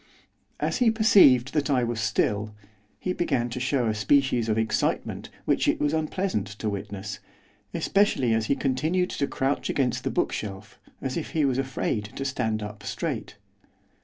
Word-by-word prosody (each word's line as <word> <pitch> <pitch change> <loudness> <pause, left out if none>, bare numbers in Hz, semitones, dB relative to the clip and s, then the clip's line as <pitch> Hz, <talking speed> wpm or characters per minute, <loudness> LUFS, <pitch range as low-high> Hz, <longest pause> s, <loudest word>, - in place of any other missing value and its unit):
As - - 0
he 245 -3 +4
perceived 190 - +5
that 150 -1 0
I 130 -3 +3
was 120 -1 -2
still, 105 0 0 0.4
he 185 - -2
began 130 -9 0
to 125 - -3
show 125 -1 +1
a 110 - +1
species 120 +2 +2
of 110 - +1
excitement 110 0 -1 0.2
which - - +2
it - - +2
was 145 +1 +1
unpleasant 160 - -1
to 105 +1 -4
witness, 100 0 -5 0.5
especially 170 - +2
as 110 0 0
he 140 - +2
continued 155 +8 0
to 140 - -1
crouch 135 +2 -1
against 125 -2 0
the - - 0
bookshelf, 105 +1 -3 0.2
as 135 +2 -2
if 165 - -5
he 155 -3 +2
was 130 -1 +1
afraid 130 -5 -1
to 135 - -4
stand 110 -5 -1
up 105 0 -7
straight. 100 - -4
125 Hz, 165 wpm, -26 LUFS, 110-145 Hz, 0.5 s, perceived